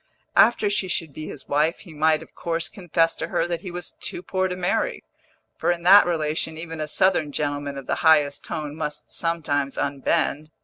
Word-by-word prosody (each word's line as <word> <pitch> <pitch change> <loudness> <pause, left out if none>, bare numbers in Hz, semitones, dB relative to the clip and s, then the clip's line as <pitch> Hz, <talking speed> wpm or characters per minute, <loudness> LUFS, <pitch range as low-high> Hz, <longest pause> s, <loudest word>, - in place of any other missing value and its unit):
After 235 -3 +5
she 200 -2 0
should 165 -4 -2
be 155 +2 -7
his 145 - -9
wife 150 +3 +1
he 175 -5 -12
might 155 +1 +2
of - - -19
course 165 -1 -2
confess 170 -3 0
to - - -3
her - - 0
that 170 -1 -3
he 185 - -6
was 175 0 -7
too 175 - -5
poor 185 0 0
to 180 - -3
marry, 185 - -1 0.6
for - - 0
in 170 -1 -3
that 195 +3 +8
relation 160 -1 -1
even 160 -1 -6
a 155 - -2
Southern 160 -2 +2
gentleman 145 -1 -2
of 135 - -7
the - - -1
highest 150 -3 +4
tone 150 -3 -5
must 150 -1 -5
sometimes 145 -5 -1
unbend. 145 +2 0
160 Hz, 200 wpm, -24 LUFS, 150-175 Hz, 0.6 s, that